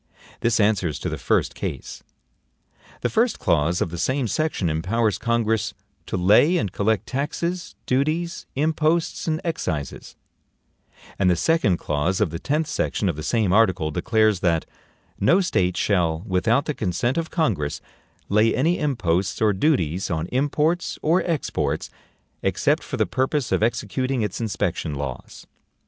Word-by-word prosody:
This 115 -1 +1
answers 95 -8 +2
to - - -3
the - - -4
first - - +1
case. - - -6 1.0
The - - 0
first 230 +1 +2
clause 85 +2 +1
of 85 - -1
the 85 - -5
same 130 +3 0
section 135 - -1
empowers 100 +7 0
Congress 115 -2 0 0.3
"to - - -2
lay 105 - +5
and 100 - -1
collect 110 +1 0
taxes, 165 +7 -3
duties, 155 +7 -1
imposts 155 +4 0
and 155 -1 0
excises"; 85 - -4 1.0
and 95 -2 +4
the 90 - +4
second 110 - +2
clause 75 +6 -1
of 105 -7 +1
the 85 - -4
tenth 150 +3 0
section 110 -9 -1
of 85 - -1
the 75 - -6
same 105 +2 +1
article 95 -8 +3
declares 110 +3 +2
that, 85 -3 +1 0.5
"NO 170 - +4
STATE 90 - 0
SHALL, 85 -5 +1
without 110 +7 +1
the 150 - -1
consent 115 - -1
of 165 - -4
Congress, 80 - -1 0.5
lay 105 +3 +3
any 160 +9 +1
imposts 100 - 0
or 110 -2 +3
duties 95 - +1
on 80 -1 -1
imports 150 +6 0
or 170 +4 +3
exports, 160 -4 -1 0.5
except - - +1
for - - -5
the - - +2
purpose 130 0 -1
of - - +2
executing 120 +2 0
its 105 +2 -3
inspection 90 -7 -2
laws." 70 -3 -6
110 Hz, 150 wpm, -23 LUFS, 90-145 Hz, 1.0 s, lay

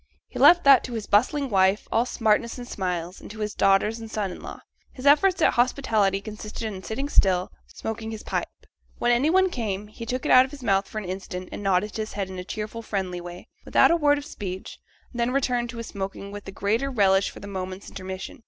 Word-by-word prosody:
He - - -8
left 350 0 +7
that 275 -2 +7
to 250 - -7
his 220 -3 -4
bustling 275 +7 +2
wife, 190 -2 +2
all 230 +2 +2
smartness 225 +1 +1
and 245 -1 -8
smiles, 180 -4 -4
and - - -10
to 215 - -10
his 210 -1 -3
daughters 200 +3 +2
and 225 -1 -8
son 210 -4 -2
in - - -9
law. - - -9 0.3
His 255 - -10
efforts 325 +7 +5
at - - +4
hospitality 220 -6 +2
consisted 215 +1 -7
in 200 -4 -5
sitting 245 +8 -4
still, 185 -9 +2 0.2
smoking 220 0 -6
his 220 -1 -7
pipe; - - -2 0.5
when 240 - +2
any 250 +6 +3
one 375 +1 +3
came, 210 - -3
he 230 +2 -9
took 255 +1 -3
it - - +1
out 255 - +9
of 265 - -6
his 275 -2 -11
mouth 195 -3 +2
for - - -8
an 215 - -3
instant, 185 0 -6
and - - -6
nodded 195 +1 +1
his 215 0 -4
head 195 -2 -3
in 185 - -6
a - - -5
cheerful 215 +4 -5
friendly 190 -5 -3
way, 175 0 -9 0.2
without - - +4
a - - +5
word 290 -3 +3
of 290 - -6
speech; 190 -6 -7 0.3
and 240 - -6
then 235 +1 +2
returned 250 -2 0
to 235 - -7
his 230 - -5
smoking 195 0 -6
with 205 0 -8
the - - -7
greater 220 +8 0
relish 195 -5 +3
for - - -11
the - - -10
moment's 190 0 -6
intermission. 190 +2 -7
215 Hz, 235 wpm, -25 LUFS, 195-245 Hz, 0.5 s, out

